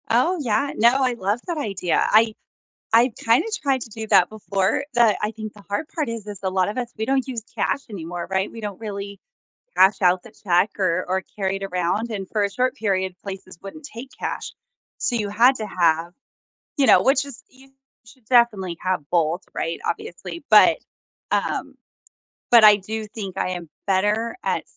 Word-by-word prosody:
Oh, 255 Hz, +11 st, +2 dB
yeah, 245 Hz, +2 st, 0 dB
no, 240 Hz, +4 st, +4 dB
I 255 Hz, -1 st, +2 dB
love 210 Hz, 0 st, -1 dB
that 345 Hz, -2 st, -2 dB
idea. 195 Hz, -, 0 dB
I 220 Hz, +1 st, +5 dB, 0.6 s
I 235 Hz, +3 st, +5 dB
kinda 230 Hz, -, +4 dB, 0.2 s
tried 270 Hz, -3 st, +1 dB
to 230 Hz, -, -7 dB
do 220 Hz, 0 st, -7 dB
that 180 Hz, -4 st, +5 dB
before, 200 Hz, +1 st, -1 dB
but 235 Hz, -3 st, +5 dB
I 210 Hz, -, -1 dB
think 215 Hz, -1 st, -8 dB
the 205 Hz, -, -15 dB
hard 205 Hz, +10 st, -2 dB
part 305 Hz, -6 st, -2 dB
is 230 Hz, -3 st, -5 dB
is 205 Hz, -2 st, -7 dB
a 190 Hz, -, +1 dB
lot 185 Hz, 0 st, +1 dB
of 210 Hz, -, -6 dB
us, 245 Hz, -1 st, -3 dB
we 220 Hz, -, -2 dB
don't 270 Hz, +1 st, 0 dB
use 245 Hz, -3 st, -4 dB
cash 275 Hz, -, -1 dB
anymore, 175 Hz, -3 st, -6 dB
right? 190 Hz, +1 st, 0 dB
We 230 Hz, -, -9 dB
don't 205 Hz, -3 st, -6 dB
really 200 Hz, -2 st, -6 dB, 0.6 s
cash 190 Hz, +2 st, +5 dB
out 180 Hz, 0 st, +4 dB
the 235 Hz, -, -14 dB
check 185 Hz, -1 st, +1 dB
or 185 Hz, -2 st, +1 dB
or 190 Hz, +1 st, 0 dB
carry 195 Hz, -1 st, -1 dB
it 195 Hz, -, -8 dB
around, 190 Hz, +5 st, -1 dB
and 195 Hz, -4 st, -5 dB
for 215 Hz, -, 0 dB
a 200 Hz, -, -1 dB
short 255 Hz, +5 st, 0 dB
period, 190 Hz, -5 st, -1 dB
places 190 Hz, -3 st, -8 dB
wouldn't 240 Hz, +11 st, -10 dB
take 260 Hz, -2 st, -9 dB
cash -, -, -4 dB, 0.5 s
so 240 Hz, -, 0 dB
you 210 Hz, -3 st, -1 dB
had 235 Hz, +6 st, +5 dB
to 215 Hz, -, -4 dB
have 170 Hz, -3 st, +1 dB, 0.6 s
you 275 Hz, -, +3 dB
know, -, -, +6 dB
which 270 Hz, +1 st, +3 dB
is 280 Hz, -4 st, -11 dB
you 265 Hz, +1 st, -20 dB, 0.3 s
should 245 Hz, +1 st, -19 dB
definitely 215 Hz, -8 st, +3 dB
have 185 Hz, -2 st, 0 dB
both, 170 Hz, +1 st, +1 dB
right, 165 Hz, 0 st, -3 dB
obviously. 185 Hz, -, -5 dB
But, 220 Hz, +10 st, +7 dB, 0.5 s
um, -, -, -1 dB, 0.8 s
but 235 Hz, -2 st, +7 dB
I 210 Hz, -1 st, +9 dB
do 215 Hz, +2 st, -5 dB
think 200 Hz, -3 st, -7 dB
I -, -, 0 dB
am 175 Hz, -3 st, -6 dB, 0.2 s
better 210 Hz, +4 st, +1 dB
at -, -, -1 dB
210 Hz, 195 wpm, -22 LUFS, 190-235 Hz, 0.8 s, I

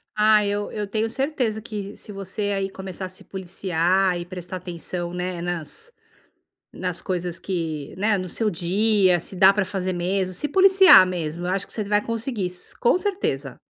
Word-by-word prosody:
Ah, 215 Hz, 0 st, +5 dB
eu 205 Hz, 0 st, -2 dB
eu 210 Hz, -1 st, -3 dB
tenho 220 Hz, +2 st, -1 dB
certeza 255 Hz, -5 st, -1 dB
que 210 Hz, -2 st, -6 dB
se 210 Hz, -, -8 dB
você 200 Hz, +1 st, -3 dB
aí 195 Hz, -1 st, -1 dB
começar 190 Hz, -1 st, -7 dB
a 185 Hz, -, -6 dB
se 185 Hz, -, -6 dB
policiar 185 Hz, 0 st, 0 dB
e 175 Hz, -, -6 dB
prestar 180 Hz, 0 st, -6 dB
atenção, 175 Hz, 0 st, -5 dB
né, 180 Hz, -1 st, -3 dB
nas 175 Hz, -, -5 dB, 0.8 s
nas 180 Hz, -2 st, -4 dB
coisas 180 Hz, -2 st, -3 dB
que, 160 Hz, -6 st, -4 dB
né, 210 Hz, +1 st, +2 dB
no 185 Hz, -1 st, -4 dB
seu 220 Hz, +4 st, 0 dB
dia, 190 Hz, +1 st, +2 dB
se 185 Hz, -, -8 dB
dá 190 Hz, +2 st, +7 dB
para 205 Hz, -1 st, 0 dB
fazer 185 Hz, 0 st, -2 dB
mesmo, 185 Hz, +1 st, -1 dB
se 295 Hz, +11 st, -2 dB
policiar 380 Hz, -, +8 dB
mesmo, 175 Hz, -2 st, -4 dB
eu 180 Hz, -, -1 dB
acho 195 Hz, +1 st, -2 dB
que -, -, -9 dB
você 215 Hz, -, -2 dB
vai 205 Hz, +1 st, +1 dB
conseguir, 230 Hz, -4 st, -2 dB, 0.3 s
com 240 Hz, -, +4 dB
certeza. 400 Hz, +1 st, -3 dB
190 Hz, 180 wpm, -23 LUFS, 180-215 Hz, 0.8 s, policiar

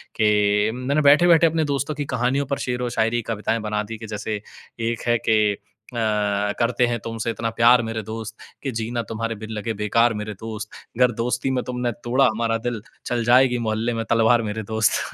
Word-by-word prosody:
कि 105 Hz, 0 st, +3 dB
मैंने 130 Hz, +5 st, 0 dB
बैठे-बैठे 165 Hz, +3 st, +6 dB
अपने 160 Hz, 0 st, 0 dB
दोस्तों 140 Hz, +2 st, -2 dB
की 145 Hz, 0 st, -3 dB
कहानियों 130 Hz, +4 st, +1 dB
पर 140 Hz, 0 st, -2 dB
शेरो-शायरी, 120 Hz, -1 st, 0 dB
कविताएँ 115 Hz, +1 st, -1 dB
बना 105 Hz, 0 st, -2 dB
दी 110 Hz, +2 st, -7 dB
कि 110 Hz, 0 st, -9 dB
जैसे 105 Hz, 0 st, -4 dB, 0.4 s
एक 115 Hz, 0 st, -2 dB
है 120 Hz, 0 st, +4 dB
कि 105 Hz, -2 st, +3 dB, 0.4 s
अ, -, -, -9 dB, 0.6 s
करते 120 Hz, +1 st, +2 dB
हैं 120 Hz, 0 st, -1 dB
तुमसे 115 Hz, 0 st, -3 dB
इतना 115 Hz, 0 st, -3 dB
प्यार 120 Hz, +1 st, +6 dB
मेरे 115 Hz, 0 st, -3 dB
दोस्त, 110 Hz, -1 st, -6 dB, 0.3 s
कि 135 Hz, -, -2 dB
जीना 115 Hz, +1 st, -2 dB
तुम्हारे 115 Hz, 0 st, -3 dB
बिन 110 Hz, +1 st, -9 dB
लगे 110 Hz, +1 st, -3 dB
बेकार 115 Hz, +3 st, +3 dB
मेरे 105 Hz, 0 st, -5 dB
दोस्त। 110 Hz, +1 st, -7 dB, 0.3 s
गर 125 Hz, 0 st, +4 dB
दोस्ती 120 Hz, +3 st, -1 dB
में 130 Hz, -1 st, 0 dB
तुमने 125 Hz, -1 st, -1 dB
तोड़ा 130 Hz, +3 st, +3 dB
हमारा 115 Hz, -1 st, +1 dB
दिल, 115 Hz, -2 st, -4 dB, 0.2 s
चल 120 Hz, -1 st, -1 dB
जाएगी 125 Hz, +1 st, +5 dB
मोहल्ले 110 Hz, +2 st, 0 dB
में 115 Hz, -, -2 dB
तलवार 115 Hz, +1 st, +4 dB
मेरे 110 Hz, 0 st, -4 dB
दोस्त। 110 Hz, 0 st, +2 dB
115 Hz, 185 wpm, -23 LUFS, 110-125 Hz, 0.6 s, बैठे-बैठे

